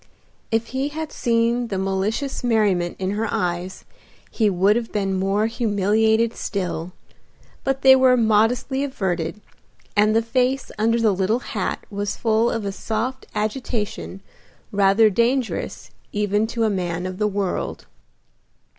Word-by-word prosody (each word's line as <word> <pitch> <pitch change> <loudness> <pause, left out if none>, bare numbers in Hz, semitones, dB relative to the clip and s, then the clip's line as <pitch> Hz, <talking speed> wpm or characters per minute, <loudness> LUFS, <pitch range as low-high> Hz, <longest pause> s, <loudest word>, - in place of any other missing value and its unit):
If 225 0 0
he 265 +2 0
had 315 +1 -5
seen 235 +1 +1
the 195 - -3
malicious 195 +9 -2
merriment 205 -7 +1
in 190 0 -2
her 215 +2 -1
eyes 180 +1 -3 0.5
he 220 -3 +2
would 195 +2 +3
have 235 -1 -2
been 195 -2 -1
more 195 +3 +1
humiliated 220 0 +2
still, 180 -3 -3 0.7
but 270 0 -1
they 265 0 +9
were 260 -1 +5
modestly 230 +4 +2
averted, 190 - -2 0.5
and 210 +1 +4
the 225 - +3
face 255 +3 0
under 230 +2 +2
the 220 -3 +3
little 190 +4 +1 0.2
hat 200 -4 -2
was 200 0 -3
full 225 +1 +2
of 225 -3 -2
a 200 - -1
soft 225 +6 -3
agitation 215 -3 -3 0.5
rather 200 +2 +4
dangerous 235 +4 -1 0.2
even 210 +1 +1
to 230 0 -2
a 220 - +3
man 180 -2 -2
of 185 +1 -5
the 210 - +2
world. 200 -2 -3
215 Hz, 140 wpm, -22 LUFS, 195-235 Hz, 0.7 s, they